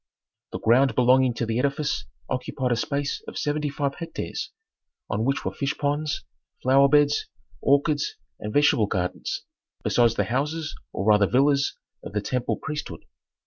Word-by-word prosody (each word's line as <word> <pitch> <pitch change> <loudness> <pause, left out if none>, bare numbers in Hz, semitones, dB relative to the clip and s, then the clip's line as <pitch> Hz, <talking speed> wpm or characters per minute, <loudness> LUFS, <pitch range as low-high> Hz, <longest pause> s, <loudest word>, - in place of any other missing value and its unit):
The - - -3
ground 130 +4 +4
belonging 125 0 +4
to 120 - -1
the 115 +1 -1
edifice 140 +2 0 0.2
occupied 130 0 -2
a - - +3
space 140 +4 -2
of - - -7
seventy 150 0 -1
five 140 0 -1
hectares, 165 -1 -5 0.6
on 110 +1 0
which 135 +1 0
were - - -2
fish 140 0 -2
ponds, 145 +1 -1 0.4
flower 135 +2 +5
beds, 145 0 +3 0.3
orchards 145 +1 +2 0.2
and 105 - -5
vegetable 130 -5 +4
gardens, 90 -3 -2 0.4
besides 120 -2 +3
the - - +2
houses 150 +6 -2 0.2
or 95 - -3
rather 105 -2 +5
villas 140 +3 +2 0.3
of - - -8
the 105 - 0
temple 125 +3 -1
priesthood. 150 -1 -6
140 Hz, 150 wpm, -25 LUFS, 120-145 Hz, 0.6 s, flower